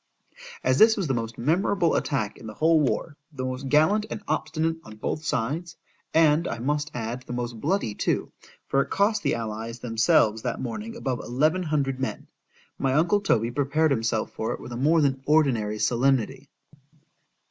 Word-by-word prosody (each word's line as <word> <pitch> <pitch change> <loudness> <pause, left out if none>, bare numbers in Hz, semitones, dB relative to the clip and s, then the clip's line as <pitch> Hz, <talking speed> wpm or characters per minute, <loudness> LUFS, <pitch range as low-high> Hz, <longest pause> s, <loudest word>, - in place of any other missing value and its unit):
As 130 +1 +2
this 220 0 +7
was 195 - -1
the 135 - 0
most 115 -1 -3
memorable 170 - +1
attack 120 -8 -1
in 110 - -10
the 110 - -8
whole 160 +4 +4
war,—the 145 -1 -3
most 130 +1 -4
gallant 190 +10 +3
and 210 - -6
obstinate 160 0 -1
on 110 - -11
both 150 +8 -3
sides,—and 160 +3 0
I 115 - -3
must 145 +5 -1
add 120 +1 -4
the 125 - -8
most 120 -2 -4
bloody 165 - 0
too, - - -1 0.4
for 135 - +2
it 140 - -4
cost 205 +2 +2
the 140 - +1
allies 115 0 -5
themselves 115 -2 +2
that 125 -1 -3
morning 215 - -5
above 130 - -2
eleven 155 +9 +1
hundred 140 -5 -1
men,—my 135 0 -5
uncle 175 +7 +3
Toby 115 - +1
prepared 145 +4 +1
himself 115 -3 0
for 110 +1 -3
it - - -7
with - - -9
a - - -4
more 155 +6 +3
than 135 -2 +1
ordinary 125 -9 +2
solemnity. 125 +1 +1
135 Hz, 170 wpm, -25 LUFS, 115-160 Hz, 0.4 s, this